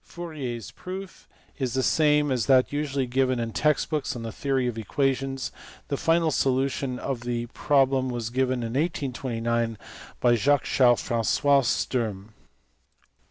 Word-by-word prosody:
Fourier 155 -8 -6
s 115 - -9
proof 185 0 -9 0.3
is 130 -2 -1
the 130 - +1
same 150 -1 +3
as 120 -5 0
that 130 +1 +4
usually 140 -2 -1
given 130 0 +1
in 115 -1 -2
text 150 +1 +1
books 150 -4 -1
on 120 - -6
the 115 - -4
theory 135 0 -1
of 120 -2 -2
equations. 135 +3 -1 0.4
The 140 - 0
final 165 +2 +2
solution 135 -1 0
of 125 -2 -3
the 120 -1 -2
problem 135 -2 +2
was 120 -2 -3
given 130 -1 0
in 115 - -3
1829 120 -6 -1 0.4
by 120 - +4
Jacques 140 +5 +3
Charles 120 -3 +3
Fra^ois 135 +4 +2
Sturm. 110 -4 -1
130 Hz, 150 wpm, -26 LUFS, 120-140 Hz, 0.4 s, that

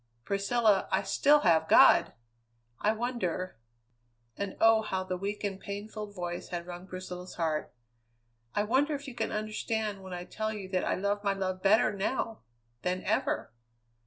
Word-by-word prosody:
Priscilla, 200 +1 +2
I 190 +1 +2
still 285 +9 +4
have 160 -2 +4
God! - - +7 0.7
I 210 - +3
wonder" 220 - -2 0.8
and, 200 -1 -4
oh! 225 0 +6
how 190 -3 -2
the 185 -1 -3
weak, 200 +3 -4 0.2
pain 200 +1 -5
filled 210 -2 -7
voice 175 -1 -4
had 170 -1 -4
wrung 175 +1 -8
Priscilla's 185 -1 -7
heart 160 -3 -1 0.8
"I 205 - +2
wonder 270 +7 +2
if 285 0 -7
you 265 - -6
can 240 - -2
understand 215 -1 -2
when 190 -1 -9
I 175 0 -4
tell 215 +3 -3
you 200 -3 -6
that 185 -1 0
I - - +1
love 200 +2 -1
my 200 -1 +2
love 185 -1 -3
better 205 +2 +4
now 220 +3 -2 0.4
than 180 +1 -1
ever? - - 0
200 Hz, 160 wpm, -30 LUFS, 185-215 Hz, 0.8 s, God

